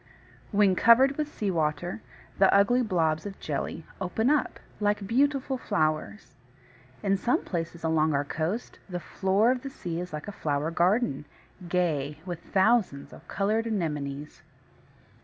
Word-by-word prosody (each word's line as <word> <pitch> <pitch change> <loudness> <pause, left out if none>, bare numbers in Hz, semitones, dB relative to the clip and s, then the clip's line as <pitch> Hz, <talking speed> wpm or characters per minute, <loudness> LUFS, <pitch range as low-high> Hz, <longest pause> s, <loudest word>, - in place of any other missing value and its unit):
When 200 -3 +3
covered 260 +7 +6
with 300 0 -3
sea 205 -8 -2
water 170 +4 -1 0.4
the 195 - +6
ugly 205 +6 +4
blobs 165 -6 0
of 195 - -9
jelly 155 +2 -4 0.2
open 220 +8 +1
out 300 -2 0 0.2
like 205 -1 0
beautiful 265 +3 +1
flowers. 155 - -1 0.7
In 195 -1 +2
some 240 +6 0
places 170 -1 -4
along 160 -2 +2
our 140 +1 0
coast 165 +11 -3
the 180 -1 -3
floor 195 +7 +2
of 255 -1 -1
the 275 - -6
sea 170 -10 -5
is 180 0 -5
like 150 +3 -6
a - - -4
flower 150 -4 -2
garden, 175 - +1 0.4
gay 150 -5 0
with 175 -3 -5
thousands 190 -8 +1
of - - -14
coloured 215 +3 0
Anemones. 150 -8 -3
185 Hz, 145 wpm, -27 LUFS, 155-220 Hz, 0.7 s, covered